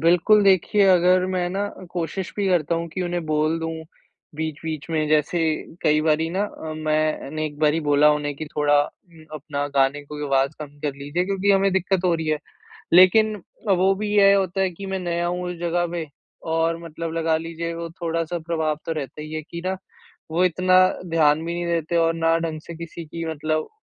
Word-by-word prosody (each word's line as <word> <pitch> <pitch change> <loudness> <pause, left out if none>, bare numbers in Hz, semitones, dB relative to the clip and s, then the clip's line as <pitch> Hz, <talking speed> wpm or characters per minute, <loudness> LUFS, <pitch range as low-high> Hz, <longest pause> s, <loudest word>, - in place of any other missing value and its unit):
बिल्कुल, 180 +5 +4
देखिए 195 +1 +4
अगर 180 0 +4
मैं 185 -1 -1
न 195 -1 -4
कोशिश 175 +2 -3
भी 200 - 0
करता 170 -2 +1
हूँ 170 0 -3
कि 175 +3 -4
उन्हें 175 -1 -2
बोल 155 +1 +1
दूँ 165 0 -3 0.6
बीच-बीच 155 -1 -4
में 155 -1 0
जैसे 155 +3 +2 0.4
कई 150 0 +3
बारी 160 +1 +1
न 185 - -4
अ, 160 -6 -4
मैंने 155 -1 -1
एक 145 -1 -9
बारी 155 +1 +2
बोला 145 +1 +5
उन्हें 145 -1 -2
कि 155 - -6
थोड़ा 145 0 +3 0.6
अपना 145 -1 -3
गाने 135 +2 +2
को 150 0 -6
आवाज़ 135 0 +2
कम 145 -1 -9
कर 145 -2 -2
लीजिए 145 +6 -2
क्योंकि 195 +1 0
हमें 195 0 +3
दिक्कत 190 0 0
हो 175 - +3
रही 160 -1 -3
है। 155 - +1 0.6
लेकिन 210 +4 +6 0.3
अ, - - +5
वो 190 +2 +3
भी 210 +2 -3
ये 200 -1 +7
होता 195 -1 +1
है 190 - +2
कि 195 +3 -9
मैं 190 0 -3
नया 175 -1 -1
हूँ 180 +1 -2
उस 180 - -5
जगह 175 0 0
पे 170 -2 -4 0.4
और 165 +1 +1
मतलब 165 0 -6
लगा 165 -1 +1
लीजिए 165 +1 -5
वो 170 0 -5
थोड़ा-सा 165 0 -2
प्रभाव 160 -2 -1
तो 165 - -3
रहता 150 -1 -6
ही 155 +1 -8
है 155 - -3
कि 170 +2 -8
न 190 0 -1 0.5
वो 175 +3 +2
इतना 185 +1 +2 0.3
ध्यान 155 -1 +3
भी 170 - -3
नहीं 175 0 -3
देते 170 0 -1
और 165 0 +3
न 165 0 +2
ढंग 160 -1 -3
से 170 - -8
किसी 170 0 -8
की 165 +2 -6
मतलब 155 0 -2
165 Hz, 200 wpm, -23 LUFS, 155-180 Hz, 0.6 s, ये